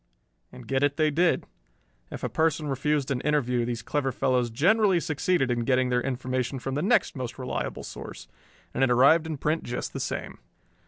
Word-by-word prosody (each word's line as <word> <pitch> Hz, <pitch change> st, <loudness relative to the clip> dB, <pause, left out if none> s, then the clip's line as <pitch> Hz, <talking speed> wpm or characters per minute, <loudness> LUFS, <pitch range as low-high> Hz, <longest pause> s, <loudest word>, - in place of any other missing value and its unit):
And -, -, -12 dB
get 135 Hz, 0 st, 0 dB
it 145 Hz, 0 st, +1 dB
they 155 Hz, -1 st, +3 dB
did. 170 Hz, +4 st, +2 dB, 0.6 s
If -, -, -8 dB
a -, -, +1 dB
person 160 Hz, -1 st, 0 dB
refused 140 Hz, +1 st, 0 dB
an 125 Hz, -2 st, -1 dB
interview 125 Hz, -5 st, +1 dB
these 120 Hz, -2 st, -4 dB
clever 135 Hz, +1 st, -1 dB
fellows 125 Hz, -2 st, +1 dB
generally 190 Hz, -, +3 dB
succeeded 155 Hz, -3 st, 0 dB
in 120 Hz, -, 0 dB
getting 125 Hz, +1 st, +1 dB
their 125 Hz, 0 st, +1 dB
information 130 Hz, 0 st, -2 dB
from 135 Hz, +1 st, -4 dB
the 145 Hz, -, -1 dB
next 220 Hz, +1 st, +2 dB
most 130 Hz, -2 st, -5 dB
reliable 130 Hz, -1 st, -4 dB
source, -, -, -9 dB, 0.5 s
and -, -, +1 dB
it 135 Hz, -, +3 dB
arrived 140 Hz, +7 st, +5 dB
in 155 Hz, -2 st, -4 dB
print 155 Hz, +4 st, 0 dB
just 120 Hz, +1 st, -5 dB
the -, -, -4 dB
same. -, -, -4 dB
135 Hz, 190 wpm, -26 LUFS, 125-155 Hz, 0.6 s, arrived